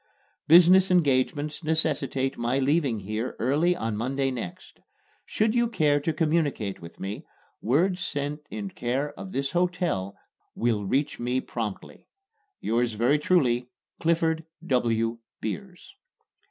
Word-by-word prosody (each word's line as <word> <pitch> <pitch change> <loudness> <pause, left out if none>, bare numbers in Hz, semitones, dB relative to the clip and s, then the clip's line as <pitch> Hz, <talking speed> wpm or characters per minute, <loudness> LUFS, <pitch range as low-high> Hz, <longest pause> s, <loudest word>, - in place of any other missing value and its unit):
Business 180 +3 +7
engagements 150 -2 +1
necessitate 145 -4 0
my 120 +3 0
leaving 135 -5 +1
here 110 +5 -3
early 150 +9 +2
on 115 -8 -2
Monday 135 +4 -1
next. 115 -9 -7 0.5
Should 215 0 +1
you 240 -1 +3
care 150 -10 +2
to 155 +3 -1
communicate 150 - 0
with 85 0 -11
me, 100 +2 -5 0.4
word 175 - +2
sent 145 -2 -3
in 205 -2 -5
care 135 +1 -2
of 190 +5 -9
this 140 -3 -2
hotel 175 - 0 0.4
will 115 -4 0
reach 140 +7 0
me 125 +2 0
promptly. 110 -6 -6 0.5
Yours 115 0 0
very 120 +7 +2
truly, 125 -8 +2 0.3
CLIFFORD 165 -1 +1 0.2
W. 115 -4 +1 0.2
BEERS. 185 - -6
140 Hz, 125 wpm, -26 LUFS, 120-165 Hz, 0.5 s, Business